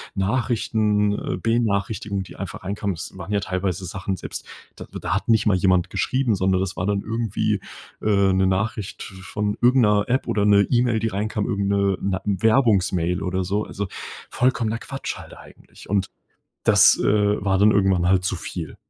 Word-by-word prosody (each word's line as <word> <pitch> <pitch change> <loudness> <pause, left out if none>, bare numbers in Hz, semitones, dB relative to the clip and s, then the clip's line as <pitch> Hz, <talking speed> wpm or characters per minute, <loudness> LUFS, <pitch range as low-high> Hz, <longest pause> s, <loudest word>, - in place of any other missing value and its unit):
Nachrichten, 105 -1 +1
äh, 90 - -3
Benachrichtigung, 105 -2 -1
die - - -13
einfach 95 -1 -7
reinkamen. 100 -1 -3
Es 90 +3 -8
waren 95 +3 -7
ja 100 - +2
teilweise 95 -1 -3
Sachen 95 +2 -4
selbst, - - -7 0.3
d - - -7
da 95 - -2
hat 100 - -2
nicht 110 -2 +3
mal 100 -3 +3
jemand 90 -1 +2
geschrieben, 130 -5 0
sondern 95 0 +1
das 95 0 -3
war 90 - -1
dann 100 -1 0
irgendwie, 110 -2 -1 0.4
äh, 100 -2 +3
'ne 95 0 +2
Nachricht 105 +2 -2
v 95 -1 -10 0.2
von 105 0 0
irgend 125 0 +5
'ner 105 -1 +3
App 130 +2 0
oder 105 -1 +1
'ne 100 -1 +6
E-Mail, 120 -2 +2
die 115 - -1
reinkam, 105 +1 -2
irgend 100 0 -1
'ne 100 -2 +1
na 95 -1 -1
Werbungsmail 100 -4 +2
oder 95 0 -1
so, 100 +4 -1
also 100 -1 -5 0.4
vollkommener 115 -3 0
Quatsch, 135 0 -5
halt - - -10
eigentlich. - - -16
Und 100 -2 0 0.5
das, - - +6
äh, 105 -1 +2
war 95 -1 +2
dann 105 +2 +5
irgendwann 95 -3 +2
halt 95 0 +3
zu 95 - -1
viel. 85 -3 -6
100 Hz, 180 wpm, -23 LUFS, 95-110 Hz, 0.5 s, ne